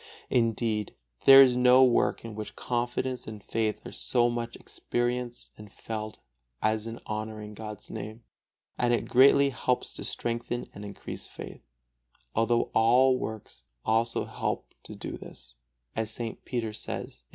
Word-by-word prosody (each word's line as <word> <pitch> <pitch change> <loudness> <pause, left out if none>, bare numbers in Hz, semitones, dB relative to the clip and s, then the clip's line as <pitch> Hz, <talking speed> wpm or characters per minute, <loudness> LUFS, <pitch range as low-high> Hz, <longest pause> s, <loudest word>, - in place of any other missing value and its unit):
Indeed 115 -3 +1 0.3
there 135 0 +11
is 125 -2 +3
no 125 +1 +7
work 125 -2 +2
in 115 - -6
which 110 0 -7
confidence 125 +1 -2
and 105 -2 -8
faith 110 0 -1
are - - -7
so 120 -1 +2
much 120 0 -4
experienced 120 0 -3
and 105 -2 -11
felt 110 -2 -6 0.4
as 110 0 0
in 115 +1 -6
honoring 110 0 -5
God's 105 -1 -8
Name; 110 +1 -7 0.6
and 120 -1 +3
it - - -3
greatly 140 +2 +6
helps 125 0 -1
to - - -7
strengthen 120 +1 -2
and 105 - -9
increase 100 -1 -7
faith, - - -9 0.7
although 115 +1 +2
all 125 +4 +5
works 110 -1 -6 0.2
also 115 +1 +1
help - - -3
to - - -9
do - - -6
this, 65 -1 -11 0.4
as 110 -1 -1
St. 115 0 -5
Peter 115 -4 -2
says, - - -5
II. - - -40
115 Hz, 150 wpm, -28 LUFS, 110-120 Hz, 0.7 s, there